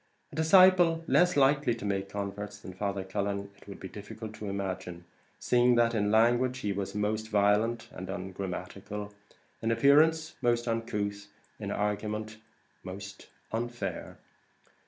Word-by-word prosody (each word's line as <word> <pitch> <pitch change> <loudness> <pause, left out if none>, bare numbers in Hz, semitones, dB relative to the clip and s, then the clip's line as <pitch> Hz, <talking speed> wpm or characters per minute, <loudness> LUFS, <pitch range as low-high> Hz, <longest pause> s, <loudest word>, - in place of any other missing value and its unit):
A - - -11
disciple 170 0 +6
less 180 -2 +4
likely 140 -2 +3
to 115 - -7
make 100 -1 -1
converts 100 0 -5
than 95 -2 -10
Father 100 0 -2
Cullen 100 +1 -3
it - - -20
would 100 - -9
be 95 - -7
difficult 105 +2 -8
to 105 -1 -6
imagine, 95 -3 -4 0.3
seeing 125 0 +3
that 120 0 +3
in 105 -2 +1
language 120 +4 +3
he 105 -1 -1
was 100 0 -4
most 105 +1 -1
violent 105 +3 +2
and 95 - -8
ungrammatical 95 +2 -5 0.5
in 115 - 0
appearance 155 +7 +4
most 120 -1 +1
uncouth 105 -3 -2 0.3
in - - -4
argument 105 +1 -2 0.5
most 95 +1 -9 0.2
unfair. 120 +1 -4
105 Hz, 135 wpm, -30 LUFS, 100-120 Hz, 0.5 s, disciple